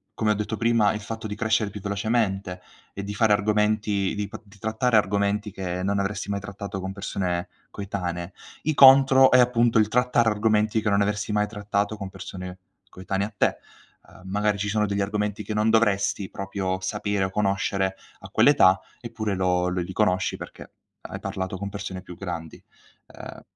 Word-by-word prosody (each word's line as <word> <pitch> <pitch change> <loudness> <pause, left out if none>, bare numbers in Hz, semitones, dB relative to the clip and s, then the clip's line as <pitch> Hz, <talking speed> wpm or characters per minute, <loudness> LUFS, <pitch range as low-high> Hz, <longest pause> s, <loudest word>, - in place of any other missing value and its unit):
come 110 -1 +1
ho - - +4
detto 105 +1 -3
prima, 115 -2 +3
il 105 - -4
fatto 110 +1 -6
di 105 - -5
crescere 110 -1 +1
più 105 - -8
velocemente 100 -2 -1 0.3
e 100 - -6
di 100 +1 -5
fare 105 +1 +3
argomenti 105 -1 +1
di 105 -1 -3
p - - -9
di 100 0 -19
trattare 110 +3 +1
argomenti 100 +1 0
che 90 -1 -4
non 100 +1 0
avresti 100 +1 -3
mai 100 - -1
trattato 100 0 -6
con 95 0 -4
persone 95 -2 -3 0.2
coetanee, 90 -3 -5 0.3
i 155 - +1
contro 135 -1 +8
è 130 - +6
appunto 120 -2 +3
il 105 - +3
trattare 120 0 +2
argomenti 110 0 +1
che 105 - 0
non 100 0 +3
avresti 105 +1 -2
mai 105 0 +2
trattato 105 0 -2
con 100 -2 -6
persone 90 -1 -8 0.3
coetanee 95 +1 -3
a 110 - -15
te. - - +2 0.5
Uhm, - - -17
magari 105 +1 +1
ci 105 +1 -2
sono 105 0 +1
degli 100 0 -1
argomenti 105 +1 -2
che 110 - -4
non 105 +1 +2
dovresti 105 -3 +1
proprio 95 -1 -3
sapere 100 0 -1
o - - -3
conoscere 95 -1 0 0.3
a - - -10
quell'età, 95 +1 +5 0.2
eppure 110 -4 -3
lo 90 -1 +1
l 90 -1 -1
li 95 - -8
conosci 90 -2 +1
perché - - -10 0.3
hai - - -7
parlato 95 0 -4
con 100 +1 -5
persone 95 -2 -6
più 90 - -11
grandi. 85 -4 -7 0.5
Ehm, - - -11
100 Hz, 185 wpm, -25 LUFS, 95-110 Hz, 0.5 s, contro